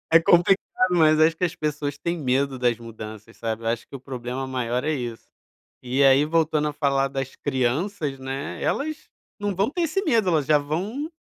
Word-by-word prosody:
É - - +10
complicado, 175 +3 +4 0.3
mas 155 -3 +4
acho 160 +1 +5
que 180 - -5
as 180 0 0
pessoas 150 -2 -3
têm 170 +3 -2
medo 135 -1 0
das 120 -2 +2
mudanças, 110 -1 -10
sabe. 115 0 -4
Eu 115 - -3
acho 115 0 -2
que - - -10
o - - -6
problema 130 0 -5
maior 125 -1 -2
é 155 - 0
isso. 120 -6 -4 0.6
E 125 +3 0
aí, 135 +1 +6
voltando 155 -1 +1
a - - -4
falar 140 -2 +1
das 135 -1 -5
crianças, 140 +3 -1
né, 135 +2 -5
elas 310 +2 -1 0.4
não 205 -2 -2
vão 195 +6 +1
ter 350 +1 -2
esse 330 +4 0
medo. 230 - +2
Elas 155 -5 +1
já 150 - +5
vão 195 - -2
145 Hz, 200 wpm, -24 LUFS, 130-165 Hz, 0.6 s, É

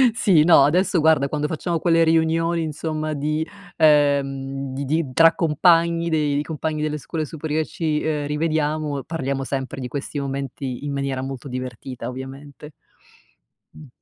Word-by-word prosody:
Sì, 185 -10 +4
no, 160 -4 +7
adesso 175 +4 +2
guarda, 155 -3 +3
quando 150 +1 -2
facciamo 165 +2 -2
quelle 165 0 +3
riunioni 165 +1 +2
insomma 155 0 -3
di 150 +2 -1 0.3
ehm, 140 -3 +2
di 140 +1 -4
di 150 -1 -1
tra 165 +4 +6
compagni 170 +1 +2
dei 150 -3 +1
di 145 - 0
compagni 155 0 -3
delle 150 0 -1
scuole 155 +2 -4
superiori 155 0 -3
ci, 155 -2 -2
ehm, 150 -2 -1
rivediamo, 150 -2 -1
parliamo 140 -4 -3
sempre 135 0 -4
di 125 - -4
questi 145 +2 -5
momenti 135 -1 -4
in 145 - -3
maniera 140 -2 -2
molto 135 0 -6
divertita, 125 0 -6
ovviamente. 135 +3 -9 1.0
Mh. 150 - -12
150 Hz, 150 wpm, -22 LUFS, 140-160 Hz, 1.0 s, no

